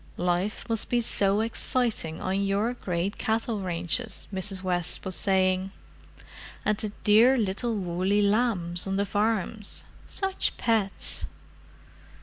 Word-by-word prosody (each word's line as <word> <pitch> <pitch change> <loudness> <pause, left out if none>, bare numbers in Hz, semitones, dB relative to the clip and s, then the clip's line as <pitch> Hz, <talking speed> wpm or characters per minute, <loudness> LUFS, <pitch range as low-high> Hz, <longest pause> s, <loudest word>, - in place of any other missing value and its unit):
"Life 180 +4 -1
must 225 -2 -1
be 245 - +2
so 205 -3 +1
exciting 225 -7 -1
on 190 +1 0
your 200 +4 +1
great 185 -4 -3
cattle 220 -1 -1
ranches," 185 +5 -2
Mrs. 190 0 -3
West 175 -2 0
was 190 - -3
saying. 190 0 +2 1.0
"And 210 - +3
the 215 +1 -2
dear 230 +5 +6
little 220 +2 0
woolly 190 +2 +1
lambs 200 -5 +1
on 195 - -1
the 200 +1 +1
farms—such 220 - -2
pets!" 220 -5 +1
200 Hz, 120 wpm, -27 LUFS, 185-225 Hz, 1.0 s, dear